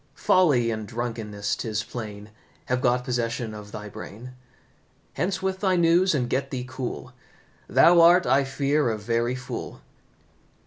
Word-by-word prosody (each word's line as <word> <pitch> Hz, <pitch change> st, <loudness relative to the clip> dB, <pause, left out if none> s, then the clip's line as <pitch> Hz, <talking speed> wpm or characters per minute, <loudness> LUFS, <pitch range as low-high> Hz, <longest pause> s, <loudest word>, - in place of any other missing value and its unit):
Folly 140 Hz, -11 st, +3 dB
and 110 Hz, -1 st, -4 dB
drunkenness, 110 Hz, -3 st, -3 dB
'tis 110 Hz, -1 st, -3 dB
plain, 105 Hz, -2 st, -8 dB, 0.3 s
Have 125 Hz, 0 st, -1 dB
got 125 Hz, -1 st, +2 dB
possession 120 Hz, -2 st, -2 dB
of 105 Hz, -1 st, -10 dB
thy 105 Hz, 0 st, -7 dB
brain. 110 Hz, +4 st, -9 dB, 0.8 s
Hence 180 Hz, -1 st, -2 dB
with 190 Hz, 0 st, -1 dB
thy 190 Hz, -2 st, +2 dB
news, 170 Hz, +1 st, +3 dB
and 125 Hz, -4 st, 0 dB
get 135 Hz, +2 st, -1 dB
thee 125 Hz, -2 st, -4 dB
cool, 130 Hz, 0 st, -6 dB, 0.5 s
Thou 170 Hz, 0 st, +6 dB
art, 175 Hz, +2 st, +6 dB
I 135 Hz, +3 st, +3 dB
fear, 140 Hz, +1 st, 0 dB
a 110 Hz, -, -2 dB
very 115 Hz, +3 st, -1 dB
fool!" 125 Hz, -1 st, -7 dB
125 Hz, 145 wpm, -25 LUFS, 110-145 Hz, 0.8 s, Thou